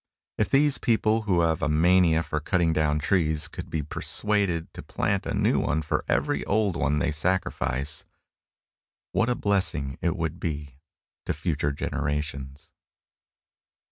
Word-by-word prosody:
If 110 - +1
these 140 0 +3
people 110 -1 +2
who 90 -2 +4
have 80 -2 +1
a 70 - +1
mania 85 +1 +4
for 75 - -2
cutting 85 +1 +1
down 75 -1 +1
trees 80 -1 +1
could - - -7
but - - -19
be 80 -2 -2
persuaded 95 +2 -1
to - - -8
plant - - -1
a - - -1
new - - +2
one 75 +3 0
for 75 - -1
every - - +1
old 100 -3 +1
one 75 -2 +1
they 75 - +1
sacrifice, 75 -5 0 1.1
what 115 - +1
a 125 - +1
blessing 90 - -1
it 85 0 0
would 80 -4 -3
be 75 -4 -5 0.5
to - - +1
future 75 -2 -1
generations! 70 -1 -4
80 Hz, 150 wpm, -26 LUFS, 75-95 Hz, 1.1 s, who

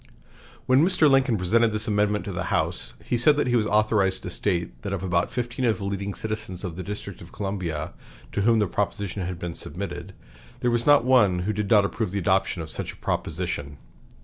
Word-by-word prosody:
When 130 +3 +5
Mr. 175 -3 +4
Lincoln 135 -4 +3
presented 110 +5 +2
this 105 0 -1
amendment 105 0 +1
to 100 - -4
the 85 -2 -3
House, 60 -6 -2
he 120 - 0
said 145 +4 +5
that 145 - +2
he 120 0 +1
was 110 -3 +2
authorized 105 -3 +2
to - - -5
state 85 -9 -2
that 100 - -4
of 95 -1 -3
about 90 -2 0
fifteen 125 +1 -3
of 115 -2 +2
the 100 - -7
leading 100 0 -3
citizens 110 -4 -5
of 90 -4 -4
the 95 - -5
District 100 -1 -6
of 85 - -12
Columbia, 90 -6 -4 0.4
to 100 - -1
whom 115 +2 +4
the 105 - +3
proposition 100 +1 -2
had 90 -1 -4
been 85 0 -5
submitted, 95 +1 -5 0.5
there 120 - +2
was 120 +2 0
not 145 -4 +6
one 115 -8 +4
who 105 - 0
did 105 -1 -2
not 105 -2 +5
approve 110 +1 -2
the 100 - -3
adoption 95 -2 +1
of 80 - -8
such - - -4
a - - -15
proposition. 75 -4 -3
100 Hz, 215 wpm, -25 LUFS, 90-115 Hz, 0.5 s, not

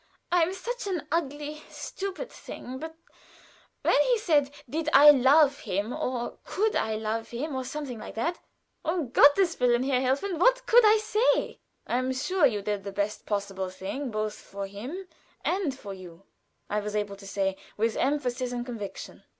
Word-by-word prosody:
I 355 0 +4
am 330 +2 +2
such 475 +4 -5
an 360 -6 -3
ugly, 300 -1 -2
stupid 395 +5 -6
thing, 255 +1 -8
but 320 +2 -7 0.9
when - - +4
he - - +3
said 300 -9 +2 0.2
did 310 +4 -2
I 295 +1 +10
love 280 +2 +5
him 205 +6 -2
or 245 -2 -3
could 430 +2 0
I 220 0 0
love 220 +1 -3
him, 280 +6 -4
or 260 - -2
something 265 -3 -5
like - - -9
that, 335 +10 -1 0.4
um 320 -6 -1
Gotteswillen, 285 -5 +5
Herr 260 -2 +2
Helfen, 295 +8 0
what - - +4
could 480 +1 +6
I 430 0 +7
say?" 435 +2 +1 0.3
"I 245 - 0
am 255 0 -1
sure 305 +5 +3
you 210 -5 -3
did 205 -1 -2
the 200 - -5
best 205 +1 -3
possible 195 -2 -2
thing 195 +9 -5
both 215 -1 -2
for 200 -1 -7
him 245 - -7 0.4
and 350 -8 0
for 200 -6 -7
you," 185 -1 -12 0.4
I 210 - 0
was 210 0 -4
able 205 -1 -1
to 195 0 -12
say, 195 -1 -1 0.2
with 225 +1 +1
emphasis 255 -3 0
and 240 -1 -3
conviction. 225 -5 -7
260 Hz, 175 wpm, -27 LUFS, 215-325 Hz, 0.9 s, I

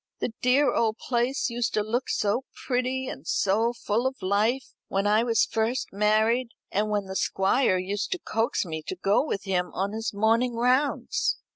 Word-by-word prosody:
The 230 - -2
dear 265 +3 +3
old 225 -1 +1
place 245 +1 -1
used 235 0 -1
to 210 - +2
look 235 +4 -2
so 220 +6 0 0.2
pretty 255 +1 -1
and 150 - -7
so 220 +4 +2
full 235 +1 -1
of 265 0 -5
life 215 +7 0
when 195 +1 -1
I 210 +2 +4
was 230 -2 +3
first 225 +2 -1
married, 220 +4 +2 0.2
and 210 +2 0
when 205 -1 0
the 190 0 -7
Squire 195 +2 +2
used 195 +3 -3
to - - -3
coax 225 - -1
me 160 -2 -5
to - - -3
go 195 +6 +2
with 210 -9 -3
him 180 -2 -1
on 195 +2 -1
his 220 +1 -3
morning 230 +4 +2
rounds. 270 - +1
225 Hz, 180 wpm, -26 LUFS, 200-250 Hz, 0.2 s, I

